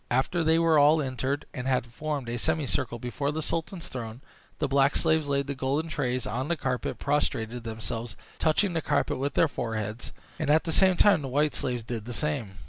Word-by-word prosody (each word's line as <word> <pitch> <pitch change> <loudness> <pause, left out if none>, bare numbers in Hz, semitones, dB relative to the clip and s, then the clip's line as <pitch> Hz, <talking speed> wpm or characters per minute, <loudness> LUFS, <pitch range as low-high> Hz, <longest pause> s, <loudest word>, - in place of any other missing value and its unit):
After 135 +7 +1
they 160 +1 +4
were 165 -2 +4
all 150 +2 +6
entered, 135 +1 -2
and 125 0 -4
had 130 -3 +1
formed 140 +2 -4
a 120 0 -3
semi 160 +2 0
circle 120 -2 -1
before 125 +5 -2
the 155 +1 -3
sultan's 165 +2 -3
throne, 115 -1 -6 0.4
the 150 - 0
black 140 +1 +3
slaves 160 -2 +2
laid 140 0 +1
the 140 - -3
golden 140 +4 -1
trays 130 -4 -1
on 125 +6 -2
the 170 0 0
carpet, 125 -3 -2
prostrated 120 -5 -1
themselves, 115 0 -5 0.2
touching 175 +4 +2
the 165 - 0
carpet - - 0
with 140 0 -2
their 165 - +5
foreheads, 110 -4 -4 0.3
and 155 - -1
at 155 +2 +5
the 165 - -2
same 185 +2 +4
time 200 -7 +5
the 135 - -4
white 145 +3 +1
slaves 125 -2 -2
did 115 -2 -5
the 120 - -5
same. 135 -10 -2
140 Hz, 210 wpm, -27 LUFS, 120-155 Hz, 0.4 s, all